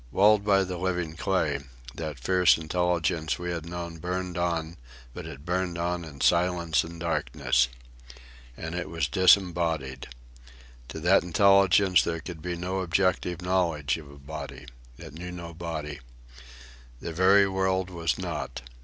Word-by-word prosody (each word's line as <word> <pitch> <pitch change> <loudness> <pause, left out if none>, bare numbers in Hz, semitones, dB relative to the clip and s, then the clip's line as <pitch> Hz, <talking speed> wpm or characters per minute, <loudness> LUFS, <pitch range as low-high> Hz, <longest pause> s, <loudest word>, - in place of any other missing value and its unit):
Walled 105 - +4
by 100 -1 +4
the 90 -2 -5
living 90 -3 -2
clay, 80 -6 0 0.3
that 80 -2 -5
fierce 90 +7 +4
intelligence 85 0 0
we 90 0 -4
had 85 -2 -5
known 85 -1 -6
burned 90 +1 -3
on; 85 -2 -2 0.4
but 85 +1 -7
it 70 -2 -10
burned 90 -1 -1
on 85 0 -2
in 75 -4 -10
silence 85 -2 +2
and 85 +1 -9
darkness. 75 -6 +1 0.9
And 80 +1 -5
it 90 0 -4
was 80 -4 -1
disembodied. 85 -6 +2 0.8
To 80 - -7
that 90 +4 +5
intelligence 95 +1 +5
there 85 -1 -2
could 80 0 -8
be 90 +1 -3
no 90 +2 -3
objective 90 -1 0
knowledge 85 -6 +1
of 75 -3 -12
a 70 - -13
body. 70 -2 -8 0.3
It - - -11
knew 90 +3 -7
no 85 -1 -8
body. 80 -3 -5 1.0
The 85 - -6
very 95 +3 +5
world 95 -1 0
was 85 -3 -1
not. 60 - -5
85 Hz, 145 wpm, -27 LUFS, 80-90 Hz, 1.0 s, that